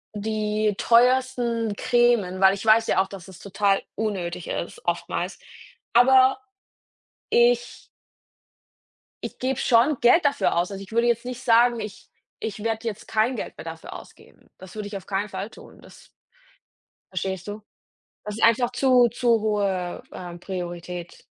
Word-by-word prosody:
die 215 0 -1
teuersten 240 -2 +2
Cremes, 240 -6 +2
weil 190 0 +6
ich 200 +2 -6
weiß 220 +1 +5
ja 190 - +3
auch, 190 - -2
dass 195 -3 -10
das 190 -2 -13
total 200 0 0
unnötig 180 -6 -3
ist, 470 - -5
oftmals, - - -3 0.5
aber 260 +4 +6 0.9
ich 240 0 +2 1.4
Ich - - -6
gebe 260 +1 -2
schon 250 +4 +3
Geld 250 +8 +5
dafür 285 -8 +2
aus. 175 +3 0
Also, 195 0 -6
ich 190 - -15
würde 235 +1 +2
jetzt 235 0 0
nicht 250 0 -6
sagen: 235 0 +4
„ich 210 -2 -8 0.3
ich 210 -1 -5
werde 225 0 -2
jetzt 215 -2 -6
kein 220 +4 +1
Geld - - -6
mehr - - -9
dafür - - -8
ausgeben.“ - - -15
Das 190 -1 -13
würde 210 -1 -5
ich 205 - -8
auf 190 - -12
keinen 200 +1 -1
Fall 195 +3 -5
tun, - - -15
das - - -17 1.0
Verstehst 190 0 -4
du? 210 +1 -6 0.6
Das 210 -1 -5
sind 225 - 0
einfach 235 +1 +4
zu 250 -3 +4
zu 235 0 +1
hohe, 200 -4 -1
ähm, 175 -1 -8
Priorität. 175 -1 -7
215 Hz, 155 wpm, -24 LUFS, 195-240 Hz, 1.4 s, weil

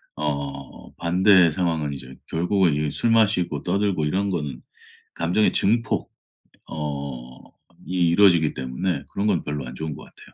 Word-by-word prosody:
어 70 -2 -5
반대의 90 0 +4
상황은 80 -3 -1
이제 65 -1 -8
결국은 90 0 +1
이 75 0 -1
술 115 - 0
마시고 100 -9 +2
떠들고 95 -3 0
이런 95 +6 0
거는 75 -7 -4 0.5
감정의 90 +6 +1
증폭 115 +3 0 0.6
어 70 -5 -6 0.4
이 90 -2 +2
이루어지기 85 -4 +4
때문에 70 +5 -3
그런 100 - -2
건 95 -6 +1
별로 75 -2 -4
안 60 - -8
좋은 80 +2 -5
것 - - -11
같아요. - - -17
80 Hz, 295 characters per minute, -23 LUFS, 70-95 Hz, 0.6 s, 반대의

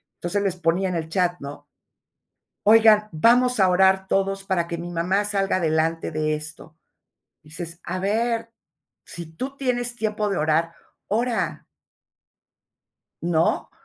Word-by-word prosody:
entonces 200 +4 -2
les 195 -3 0
ponía 180 +2 0
en 180 - -3
el 160 -1 -3
chat, 175 0 0
¿no? 145 +1 -9 1.0
"Oigan, 215 -1 +6
vamos 245 +7 +3
a 190 - +5
orar 190 +1 +3
todos 195 0 0
para 185 -3 0
que 170 0 -5
mi 170 +1 -6
mamá 180 +4 0
salga 195 -2 0
adelante 165 -1 0
de 155 0 -1
esto". 155 +1 -6 0.8
Dices: 170 +2 -7
"A 185 +1 -4
ver, 230 +3 -1 0.5
si 170 -2 -7
tú 255 +13 -6
tienes 245 -3 -1
tiempo 215 -2 -1
de 195 - -1
orar, 160 +2 +1 0.3
ora", 235 +3 -1 1.6
¿no? 165 -1 0
185 Hz, 135 wpm, -23 LUFS, 165-215 Hz, 1.6 s, Oigan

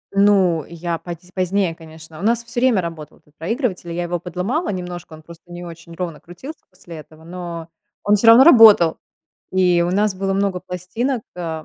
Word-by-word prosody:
Ну, 195 -5 +3
я 170 0 -5
поз 175 -1 -7 0.2
позднее, 185 -1 0
конечно. 160 -1 -13
У - - -8
нас 235 +3 +1
всё 235 +1 -5
время 245 -7 +3
работал 160 -3 -8
этот 150 -2 -30
проигрыватель. 185 - -3
Я 175 +1 -3
его 175 0 -3
подломала 180 - -3
немножко, 180 -3 -6
он 155 0 -13
просто 170 +1 -15
не 175 0 -8
очень 170 -1 -11
ровно 170 -3 -5
крутился 260 - -11
после 175 -3 -12
этого, 155 +1 -14
но 170 -1 -7 0.3
он 205 - +3
всё 210 +3 +1
равно 230 +3 +9
работал. 220 - +7 0.6
И 180 -2 +3
у 175 - -1
нас 205 +1 +1
было 195 +1 -2
много 195 -2 -1
пластинок. 210 +8 -3
А, 160 -3 -5
180 Hz, 185 wpm, -20 LUFS, 170-200 Hz, 0.6 s, равно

